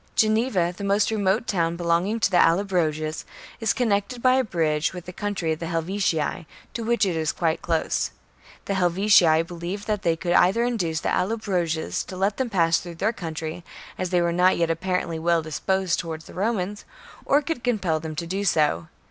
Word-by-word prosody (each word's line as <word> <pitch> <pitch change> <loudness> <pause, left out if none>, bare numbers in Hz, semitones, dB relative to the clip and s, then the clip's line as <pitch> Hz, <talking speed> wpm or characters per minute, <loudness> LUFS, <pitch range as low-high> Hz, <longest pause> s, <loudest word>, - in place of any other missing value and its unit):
Geneva, 215 -5 +2
the 200 - -7
most 200 +2 +2
remote 200 0 +1
town 170 -5 0
belonging 175 +6 0
to 210 - +2
the 175 - +4
Allobroges, 165 -4 +1 0.4
is 225 -3 +1
connected 225 0 0
by 255 +1 +4
a 260 0 +3
bridge 160 -7 0
with 180 -1 -8
the 180 - -8
country 195 -5 -2
of 160 - -2
the 165 - -4
Helvetii, 165 -2 -1 0.3
to 235 - -4
which 235 -1 +2
it 180 -3 -1
is 160 -1 0
quite 165 -2 -1
close. 165 -2 0 0.6
The 200 - -1
Helvetii 180 -3 +4
believed 175 +4 -6
that 210 -2 -1
they 165 -1 +1
could 175 +1 -2
either 195 +6 +4
induce 180 -10 -1
the - - -1
Allo 215 +5 0
broges 175 -7 -1
to 185 - -8
let 195 +2 0
them 260 -2 -1
pass 165 -4 +3
through 175 -1 -9
their 215 +7 0
country, 165 -2 -5 0.3
as 185 - -3
they 180 -1 +2
were 170 0 0
not 180 +2 +4
yet 170 -1 +1
apparently 170 -1 -2
well 170 0 +2
disposed 185 +3 -1
towards 160 -1 -5
the - - -12
Romans, 205 0 -2 0.4
or 290 +2 +3
could 285 -4 -3
compel 195 -10 0
them 155 0 -6
to 170 +2 -3
do 190 +4 -2
so. 150 - +1
180 Hz, 195 wpm, -24 LUFS, 165-205 Hz, 0.6 s, the